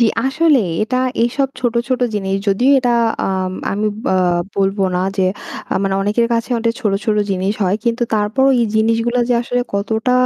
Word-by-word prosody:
জি। 235 - +5 0.2
আসলেই 270 - +2
এটা 255 +4 -1 0.3
এসব 270 +3 0
ছোটো, 240 -2 0
ছোটো 255 -1 +1
জিনিস। 195 -2 -1
যদিও 240 +7 +3
এটা 250 -2 0 0.4
আম 185 -1 -1 0.2
আমি 210 +2 -1 0.3
আ - - +2 0.4
বলবো 195 0 +1
না - - 0 0.2
যে 190 - +1 0.5
আ - - 0
মানে 195 -1 0
অনেকের 210 +4 +1
কাছে 230 +2 -2
অনেক 230 0 +1
ছোটো, 205 -5 +1
ছোটো 210 -1 +2
জিনিস 190 +1 0
হয়। 190 +1 +1
কিন্তু 235 0 0
তারপরও 220 +6 +2
এই - - +3
জিনিসগুলা 230 +2 +1
যে 245 - +3
আসলে 245 +1 -1
কতটা 220 +4 0
225 Hz, 180 wpm, -17 LUFS, 200-245 Hz, 0.5 s, জি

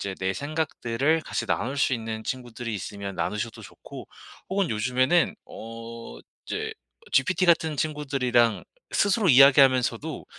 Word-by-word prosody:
이제 100 -1 -4
내 95 0 0
생각들을 150 -1 -1
같이 - - -3
나눌 135 +4 -1
수 135 - +2
있는 110 -1 -5
친구들이 120 -2 -5
있으면 100 0 -6
나누셔도 105 +6 -3
좋고 - - -11 0.4
혹은 195 -3 0
요즘에는 130 +9 +2
어 115 - -9 0.3
이제 - - -3 0.4
GPT 185 +7 +2
같은 160 -3 +3
친구들이랑 135 -6 +1 0.3
스스로 205 0 +2
이야기하면서도 135 0 +5
125 Hz, 325 characters per minute, -25 LUFS, 115-150 Hz, 0.4 s, 이야기하면서도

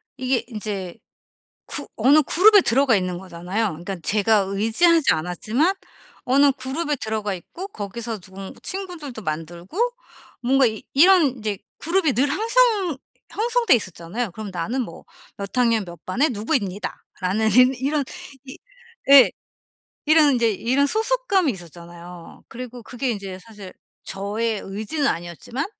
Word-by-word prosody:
이게 260 -1 0
인제 205 -6 -5 0.7
그 - - -3
어느 275 +7 +5
그룹에 405 +8 +6
들어가 260 - +3
있는 185 -2 -1
거잖아요. 185 +4 -3
그러니까 175 +3 -6
제가 210 0 +2
의지하지 225 - +3
않았지만 220 - 0 0.5
어느 275 +2 +5
그룹에 285 +4 -2
들어가 220 -3 -3
있고 335 - -8
거기서 225 - -6
누군 190 +1 -10
친구들도 345 - -6
만들고 170 - -6 0.6
뭔가 265 +2 +3
이 220 -2 -2
이런 310 -4 +5
이제 210 -3 -3 0.2
그룹이 335 -3 +1
늘 265 +4 +2
형성 435 - +2 0.6
형성돼 465 - +5
있었잖아요. 190 +1 -4
그럼 215 +1 -7
"나는 205 +10 -2
뭐 170 -8 -8 0.3
몇 200 -1 -5
학년 230 -5 +2
몇 170 -2 -12
반의 265 +12 +1
누구입니다." 210 - -2 0.2
라는 215 +4 +1 0.3
이런 285 +2 0 0.4
이 265 - -10 0.5
예. 275 -2 +9 0.7
이런 305 -2 +5
인제 235 -2 +2
이런 260 +7 +1
소속감이 440 - +1
있었잖아요. 175 -1 -12
그리고 245 0 -8
그게 250 +2 -4
인제 195 -4 -6
사실 205 -2 -12 0.3
저의 210 +3 -2
의지는 215 +10 -3
아니었지만 175 - -3
230 Hz, 305 characters per minute, -22 LUFS, 195-280 Hz, 0.7 s, 예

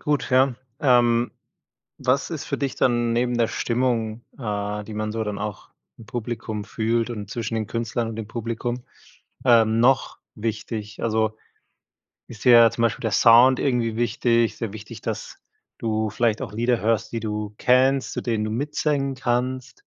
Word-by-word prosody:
gut, 145 -4 0
ja. 130 0 +4 0.3
Ähm, 120 -3 +3 0.7
was 135 +5 +1
ist 155 -4 -4
für - - -2
dich 135 -2 -2
dann 120 -2 +1
neben 120 +1 +1
der 115 -1 +3
Stimmung, 115 -2 -1 0.2
äh, 105 -2 -3
die 110 +1 -8
man 110 0 -2
so 110 0 -2
dann 105 -1 -4
auch 105 -2 -6 0.3
im 110 - -13
Publikum 110 -2 -4
fühlt 115 +2 -1
und 105 -4 -6
zwischen 115 0 -4
den 110 -2 -1
Künstlern 115 0 -2
und 110 - -6
dem 110 -2 -5
Publikum, 120 +1 -4 0.6
ähm, 115 -2 +5
noch 130 +3 +3 0.2
wichtig? 110 -1 -5
Also 110 -1 0 0.9
ist 110 -4 -11
dir 125 - +7
ja 115 -1 +8
zum 115 - -3
Beispiel 115 +2 +1
der 115 -2 -2
Sound 120 +5 +6
irgendwie 120 -5 0
wichtig, 120 -1 +1
sehr 110 -4 -4
wichtig, 105 0 -9
dass - - -5 0.4
du 110 -1 -1
vielleicht 115 0 0
auch - - -6
Lieder 120 +2 +1
hörst, 110 0 +1
die 115 - -2
du 105 -1 -4
kennst, 130 +3 +3
zu - - -3
denen 115 -3 -1
du 110 - -3
mitsingen 140 +2 -1
kannst? 130 - -2
115 Hz, 170 wpm, -23 LUFS, 110-125 Hz, 0.9 s, ja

